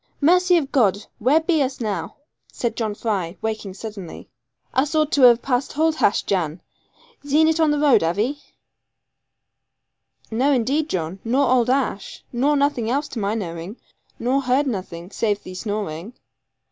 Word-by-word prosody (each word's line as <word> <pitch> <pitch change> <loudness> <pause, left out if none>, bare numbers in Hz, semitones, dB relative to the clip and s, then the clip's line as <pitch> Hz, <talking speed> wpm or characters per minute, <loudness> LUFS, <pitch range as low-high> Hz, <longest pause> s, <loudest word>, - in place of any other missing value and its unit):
'Mercy 360 +4 +4
of 285 -4 -2
God! 210 -6 +2
where 265 +8 +4
be 320 -2 +1
us 265 -1 -1
now?' 215 -4 -3 0.4
said 235 -2 -3
John 220 -3 -2
Fry, 190 -6 -2
waking 215 -3 -4
suddenly; 200 -4 -8 0.5
'us 280 +4 +1
ought 310 -1 +2
to 285 - +2
have 240 -2 +7
passed 255 0 -1
hold 315 +1 +1
hash, 200 - +2
Jan. 170 -4 -1 0.6
Zeen 300 +3 +3
it 320 0 +1
on 320 -1 +4
the 295 - +1
road, 290 -3 +4
have 165 +3 0
'ee?' 270 +8 -1 1.9
'No 255 +6 +2
indeed, 275 +6 0
John; 175 +1 -3
no 255 +5 +2
old 250 -3 +3
ash. 255 -6 -1
Nor 275 +5 +2
nothing 280 -5 0
else 285 +4 0
to 235 - -5
my 205 +1 -1
knowing; 175 +1 -5 0.4
nor 260 +3 +1
heard 260 +2 +2
nothing, 185 -6 -5
save 210 -3 -1
thee 185 - -9
snoring.' 205 -1 -4
240 Hz, 160 wpm, -22 LUFS, 205-285 Hz, 1.9 s, have